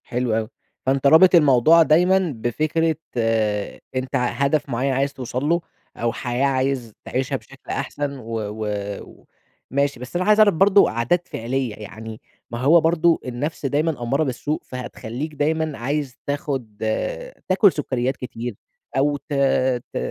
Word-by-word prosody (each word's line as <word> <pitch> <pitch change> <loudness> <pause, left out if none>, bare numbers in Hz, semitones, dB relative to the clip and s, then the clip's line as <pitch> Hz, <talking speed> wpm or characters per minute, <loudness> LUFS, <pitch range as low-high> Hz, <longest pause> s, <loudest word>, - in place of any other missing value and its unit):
حلو 125 -1 -1
أوي، 110 -1 -2 0.4
فأنتَ 135 +1 +2
رابط 180 +5 +7
الموضوع 155 +1 +6
دايمًا 180 +2 +3
بفكرة 155 +8 0 1.0
أنتَ 130 0 -2
ع 125 - +2
هدف 140 +3 0
معين 130 +2 0
عايز 135 +1 0
توصل 125 0 -4
له، 170 +1 +2 0.4
أو 115 0 -1
حياة 125 +2 -1
عايز 130 -4 0
تعيشها 135 +2 -2
بشكل 135 +1 -11
أحسن 140 -1 -3
و 115 -2 -5 0.3
و 100 -1 -6 0.5
وماشي، 140 -1 0
بس 125 +6 -9
أنا 180 +1 0
عايز 210 0 +4
أعرف 215 -1 +6
برضه 195 +4 +5
عادات 120 +11 0
فعلية 120 -1 -3
يعني 110 +1 -9 0.3
ما 115 - -4
هو 155 +7 +5
برضه 165 +1 +3
النفس 140 +5 -4
دايمًا 145 -1 0
أمّارة 135 +6 +1
بالسوء 145 +2 -2
فهتخليك 125 +3 -6
دايمًا 155 0 -1
عايز 140 +1 -3
تاخد 135 -6 -3 0.7
تاكل 190 +1 +5
سكريات 130 -3 -2
كتير 120 -2 -6 0.4
أو 145 +2 +2
ت 145 +2 -9 0.6
ت - - -3
135 Hz, 145 wpm, -22 LUFS, 120-155 Hz, 1.0 s, رابط